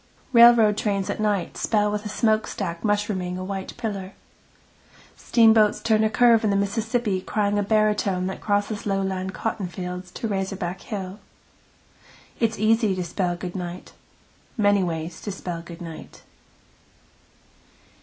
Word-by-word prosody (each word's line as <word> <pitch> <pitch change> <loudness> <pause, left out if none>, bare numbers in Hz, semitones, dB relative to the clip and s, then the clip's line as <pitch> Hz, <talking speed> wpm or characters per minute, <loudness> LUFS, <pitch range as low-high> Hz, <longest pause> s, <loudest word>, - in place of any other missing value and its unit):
Railroad 235 -3 +7
trains 200 -3 -1
at - - -5
night 205 -4 -1
spell 210 -2 +1
with 210 +1 -3
a - - -6
smokestack 215 -6 -1
mushrooming 205 -4 -1
a 185 - -5
white 195 0 -5
pillar. 200 -5 -4 1.0
Steamboats 220 -2 +4
turn 220 -1 +2
a 220 - +3
curve 230 0 +4
in 215 - +2
the 200 - +1
Mississippi 210 0 0
crying 205 +1 0
a - - +2
baritone 210 -3 +1
that 190 - -5
crosses 205 0 -1
lowland 190 -1 -2
cottonfields 180 -3 -4
to 225 - -3
razorback 190 -3 -3
hill. 195 -2 -6 1.2
It 230 - +3
is 220 - -9
easy 215 -2 +3
to 185 - -2
spell 175 +1 -2
good 175 +1 -7
night. 180 -1 -6 0.6
Many 205 -2 +3
ways 165 -1 -4
to 205 - -4
spell 175 -3 -5
good 170 0 -10
night. 165 -2 -10
200 Hz, 140 wpm, -24 LUFS, 185-215 Hz, 1.2 s, Railroad